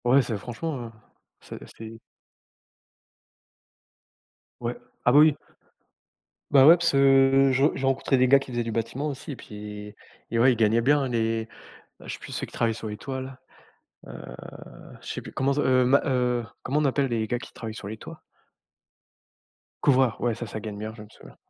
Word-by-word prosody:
Ouais, 130 +3 +5
c'est 115 - -3
franchement, 130 +7 -5
heu, - - -12 0.5
c - - -10 0.2
c'est 110 0 -8 2.7
Ouais. 120 0 -3 0.3
Ah 125 - +5
bah, 145 - +7
oui. 155 -1 +6 1.2
Bah 135 -1 +7
ouais, 165 - +10
parce 170 -1 +1
que 135 0 +5
je 135 +1 +2
j'ai 135 - -3
rencontré 135 0 +1
des 130 0 +4
gars 140 +2 +7
qui 135 -1 -6
faisaient 120 -1 -1
du 115 -1 -4
bâtiment 115 +6 -2
aussi 145 +2 -6
et - - -5
puis, 105 -1 -9 0.4
et 115 - 0
ouais, 130 +3 +6
ils 120 - -1
gagnaient 110 +1 +3
bien 140 +2 +2
les 115 -2 -1 0.5
bah, - - -15
je - - -4
sais - - -8
plus - - -10
ceux - - -3
qui - - -16
travaillent 115 -1 +1
sur 110 0 -7
les 105 - -5
toits 130 +4 -6
là, 130 0 -8 0.7
heu, - - -10 0.9
je - - -11
sais - - -4
plus, - - -11
comment 135 +1 0
se, 145 - 0
heu, 130 -2 +3
ma 135 +3 +4
heu, 125 -3 0 0.2
comment 145 - -1
on 150 - +1
appelle 140 0 +1
les 115 -3 -1
gars 120 +2 -2
qui - - -11
travaillent 110 -2 -7
sur 105 -3 -8
les 110 - -6
toits? 165 +7 -11 1.6
Couvreur, 130 -5 +3
ouais 120 -2 0
ça, 120 - -6
ça 110 0 -6
gagne 105 -1 -7
bien 110 +1 -6
je 110 - -12
me 105 - -11
souviens. - - -16
125 Hz, 200 wpm, -25 LUFS, 115-135 Hz, 2.7 s, ouais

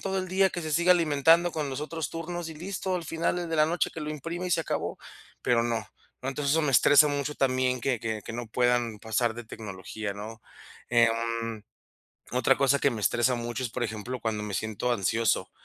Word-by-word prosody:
todo 195 0 -2
el 185 -1 -3
día 190 +1 +3
que 175 - -4
se 155 - -4
siga 175 +4 +5
alimentando 165 +1 +4
con 150 -3 -2
los 130 - -4
otros 160 +1 -4
turnos 165 +1 -5
y - - -8
listo. 185 +3 -3
Al 170 - -5
final 165 +2 -1
el 175 - -4
de 160 - 0
la 155 - +5
noche 175 +2 0
que 165 - -7
lo 150 0 -4
imprima 165 +4 -4
y - - -3
se 170 - +3
acabó". - - -3 0.4
Pero 120 -1 +3
no, 115 -1 -1 0.4
¿no? 130 - -3
Entonces, 140 0 -1
eso 160 +1 +3
me 145 -3 +1
estresa 145 +4 +7
mucho 145 0 -2
también 130 -1 +1
que 125 0 0
que 110 -1 -3
que - - -6
no 120 0 -4
puedan 120 -1 +1
pasar 115 +1 0
de 120 +1 -8
tecnología, 105 -1 -6
¿no? 110 +3 -8 0.5
Em, 115 -1 +1 0.7
otra 125 +2 +3
cosa 140 0 +3
que 140 - +3
me 115 -4 -4
estresa 120 +5 +2
mucho 120 +2 -4
es, 120 - -3
por 120 - -2
ejemplo, 110 +3 -4
cuando 110 -2 -2
me 105 -1 -4
siento 110 +4 -2
ansioso. 115 +2 +1
130 Hz, 220 wpm, -28 LUFS, 115-160 Hz, 0.7 s, estresa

